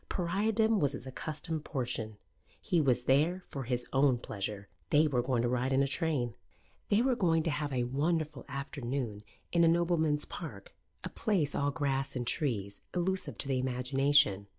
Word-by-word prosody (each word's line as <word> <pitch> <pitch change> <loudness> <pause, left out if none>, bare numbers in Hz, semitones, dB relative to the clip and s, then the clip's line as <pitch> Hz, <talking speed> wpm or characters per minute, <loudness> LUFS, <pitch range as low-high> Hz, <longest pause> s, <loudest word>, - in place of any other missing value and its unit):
Pariahdom 210 +5 +1
was 145 -2 +1
his 125 - -7
accustomed 155 +3 -4
portion. 115 -7 -3 0.4
He 170 - +1
was 125 -4 +2
there 155 +8 +2
for 135 -3 -5
his 125 0 -1
own 135 -2 +4
pleasure. 100 -2 -5 0.2
They 150 +2 +5
were 130 -4 +1
going 120 -1 0
to - - +2
ride 125 +2 0
in 135 +1 +4
a - - +1
train. 140 -6 -1 0.6
They 210 +3 +4
were 260 -1 +2
going 165 -7 +2
to 165 - 0
have 145 -1 -2
a 125 -2 0
wonderful 150 +3 -1
afternoon 135 -5 -4 0.3
in 170 -1 +4
a - - +6
nobleman's 165 -3 +2
park, - - -8 0.3
a - - -4
place 185 - 0
all 140 0 +1
grass 135 -2 -1
and 125 -1 -2
trees, 105 -8 -1
elusive 185 +2 -1
to - - +2
the 135 -2 +1
imagination. 130 -4 +2
140 Hz, 175 wpm, -31 LUFS, 125-165 Hz, 0.6 s, a